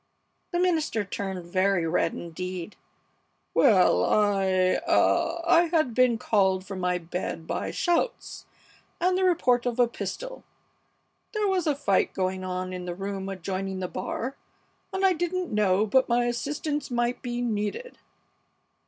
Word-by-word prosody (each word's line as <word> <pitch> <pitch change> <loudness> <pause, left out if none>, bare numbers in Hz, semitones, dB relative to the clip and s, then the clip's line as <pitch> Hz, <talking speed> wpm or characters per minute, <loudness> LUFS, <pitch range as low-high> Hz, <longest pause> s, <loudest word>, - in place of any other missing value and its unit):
The 350 - 0
minister 320 - +1
turned 190 -2 -5
very 185 0 +1
red 165 +2 +1
indeed. 180 +2 -6 0.8
"Well, 185 - +5
I 190 - +2
ah 335 +1 +2
I 340 0 +5
had 315 -7 +1
been 250 -1 +3
called 190 -5 +1
from 195 -1 -6
my 180 0 +1
bed 170 -1 -5
by - - -3
shouts 350 +8 -1 0.5
and 365 +1 +2
the 375 - +1
report 250 -10 +2
of 240 -1 -2
a 245 - +5
pistol. - - -6 0.9
There 425 -2 0
was 370 -4 0
a 295 - +2
fight 200 -9 +1
going 185 0 -1
on 185 0 -3
in 180 -1 -5
the 175 -1 -4
room 195 0 -4
adjoining 190 0 -4
the 185 - -2
bar, 235 +9 -4 0.6
and 380 0 0
I 380 - +5
didn't 350 -3 -2
know 205 -1 +3
but 260 +5 +2
my 240 +1 +3
assistance 290 +5 -2
might 240 0 -1
be 240 -1 -3
needed!" 230 - -3
215 Hz, 145 wpm, -26 LUFS, 185-300 Hz, 0.9 s, Well